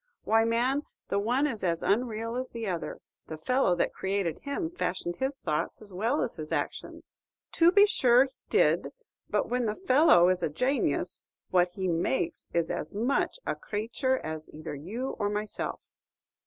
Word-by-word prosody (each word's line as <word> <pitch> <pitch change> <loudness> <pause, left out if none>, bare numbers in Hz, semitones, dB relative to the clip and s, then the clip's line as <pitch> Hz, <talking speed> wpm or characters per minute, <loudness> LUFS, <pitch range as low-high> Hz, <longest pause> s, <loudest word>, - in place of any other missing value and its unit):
Why, 225 +1 +3
man, 245 +5 +1 0.3
the 200 - +1
one 245 +7 +1
is 230 -9 -2
as 170 -2 0
unreal 230 +1 0
as 255 0 -3
the 230 -1 -5
other. 175 -4 -4 0.3
The 160 - -6
fellow 250 +2 +2
that 175 - 0
created 190 -4 -1
him 290 +5 -3
fashioned 180 - -3
his 265 +1 -2
thoughts 155 - -2
as 205 -3 -9
well 225 +10 +1
as 230 - -4
his 155 -1 -6
actions." - - -4 0.4
"To 335 +1 +5
be 405 +2 +7
sure 250 - +5
he 270 - -6 0.2
did; - - +2 0.4
but - - +1
when 245 -1 0
the 210 - -1
fellow 260 - +5
is 185 -1 +1
a - - 0
janius, 255 - -1 0.2
what 180 -1 +4
he 190 -1 -2
makes 165 -3 -1
is 170 -1 0
as 155 - -4
much 245 - 0
a - - 0
crayture 230 +5 -1
as 155 -4 -6
either 155 +1 -7
you 210 - -4
or 205 - +1
myself." 210 +1 -3
215 Hz, 175 wpm, -29 LUFS, 175-260 Hz, 0.4 s, be